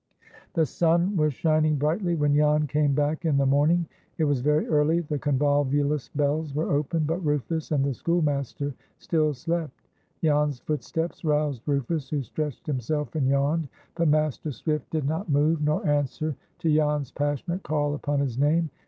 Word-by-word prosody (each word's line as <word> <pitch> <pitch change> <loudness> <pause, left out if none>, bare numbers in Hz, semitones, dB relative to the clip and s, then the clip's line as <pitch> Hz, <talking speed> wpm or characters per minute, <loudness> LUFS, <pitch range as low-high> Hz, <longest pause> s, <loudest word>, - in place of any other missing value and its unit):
The 160 - +3
sun 170 +5 +1
was 155 -3 +2
shining 155 0 +2
brightly 170 +5 0
when 150 -2 +2
Jan 150 +1 +3
came 145 0 +1
back 150 +4 0
in 155 -4 +2
the 140 - +3
morning. 150 +6 +3 0.3
It 160 - +1
was 145 -4 +1
very 150 +3 +2
early. 155 +2 +2
The 150 -3 -3
convolvulus 145 0 +1
bells 145 0 0
were 155 - -1
open, 150 +3 0
but 165 +4 -2
Rufus 150 +2 -1
and 140 -3 +2
the 140 - 0
schoolmaster 145 -2 -1 0.2
still 155 -2 +1
slept. 165 0 -3 0.4
Jan's 150 -3 +2
footsteps 160 +4 -3
roused 150 -5 0
Rufus, 140 +1 -1
who 145 -3 -1
stretched 150 +3 -5
himself 150 +1 -2
and 145 -5 +1
yawned, 140 +3 +1 0.3
but 170 -1 +1
Master 155 0 +1
Swift 150 +5 -3
did 155 -4 -1
not 160 +5 -2
move, 150 +2 +2
nor 150 +1 0
answer 145 +1 0 0.2
to 160 -2 +1
Jan's 150 -3 +1
passionate 145 +5 -2
call 145 -3 -1
upon 145 -1 -1
his 130 -3 -2
name. 155 +2 +2
150 Hz, 165 wpm, -26 LUFS, 145-160 Hz, 0.4 s, The